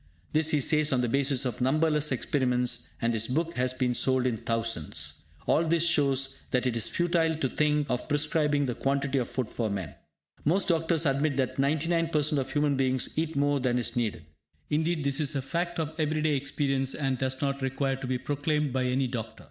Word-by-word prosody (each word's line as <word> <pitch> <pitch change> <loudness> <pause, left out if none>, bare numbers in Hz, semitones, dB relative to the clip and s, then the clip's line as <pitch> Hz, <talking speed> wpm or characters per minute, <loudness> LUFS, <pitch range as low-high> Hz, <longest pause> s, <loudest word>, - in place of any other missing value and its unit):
This 155 +1 +3
he 150 -2 +2
says 155 +2 +3
on 130 -2 +2
the 120 - 0
basis 135 +1 +1
of 125 -1 -3
numberless 150 +2 +2
experiments, 125 -2 0
and 115 0 +2
his 110 0 0
book 165 +6 -1
has 125 0 +1
been 130 -1 0
sold 130 +1 +2
in 125 -3 +1
thousands. 115 -8 -2 0.2
All 160 - +3
this 165 0 +2
shows 135 -4 +2
that 125 0 +1
it 125 -2 0
is 115 -1 +1
futile 170 -2 +1
to 150 -4 -1
think 150 +1 +1
of 125 -2 -2
prescribing 145 -1 +1
the 125 - -2
quantity 140 +1 0
of 120 - -3
food 130 -4 -2
for 115 -2 -2
men. 100 -4 -4 0.5
Most 180 +7 +2
doctors 165 -1 +2
admit 140 0 +1
that 130 -2 -1
99% 155 +1 +1
of 135 0 -3
human 145 -1 +1
beings 130 -1 0
eat 160 0 -1
more 145 0 +2
than 125 -2 +1
is 115 0 -1
needed. 110 -10 -2 0.5
Indeed, 160 +1 0
this 140 +1 0
is 145 -1 0
a 135 - 0
fact 170 +4 -2
of 160 -1 -2
everyday 155 -1 +1
experience, 135 -1 -1
and 135 -4 -1
does 130 0 -1
not 140 -1 -1
require 135 +1 -1
to 135 - -6
be 130 0 0
proclaimed 145 +1 -1
by 130 -1 0
any 130 +1 +1
doctor. 115 -3 -5
140 Hz, 200 wpm, -28 LUFS, 125-155 Hz, 0.5 s, This